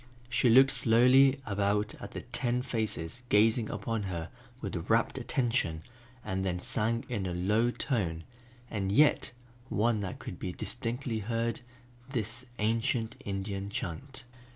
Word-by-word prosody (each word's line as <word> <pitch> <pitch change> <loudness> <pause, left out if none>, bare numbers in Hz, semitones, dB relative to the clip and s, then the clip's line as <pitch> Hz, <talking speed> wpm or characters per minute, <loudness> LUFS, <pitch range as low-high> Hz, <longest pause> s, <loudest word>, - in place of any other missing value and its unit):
She 120 +1 +3
looked 135 +4 +7
slowly 130 +3 +5
about 105 +1 0
at - - -8
the - - -4
ten 125 0 0
faces 110 -3 -2
gazing 110 +2 +4
upon 115 -2 -2
her 85 -3 -4 0.3
with - - -5
rapt - - +2
attention 115 -11 0 0.4
and 95 -2 -1
then 90 -2 0
sang 115 +5 0
in 105 -6 -2
a 90 - -3
low 105 +7 +2
tone, 95 - -1 0.4
and 100 -4 -2
yet 145 +8 +4 0.4
one 110 +1 +2
that 95 -2 -4
could 90 - -8
be 90 - -4
distinctly 120 +1 -3
heard, 115 +2 -1 0.5
this 115 0 -3
ancient 115 +2 0
Indian 100 0 -3
chant. 125 - -5
110 Hz, 135 wpm, -30 LUFS, 100-120 Hz, 0.5 s, looked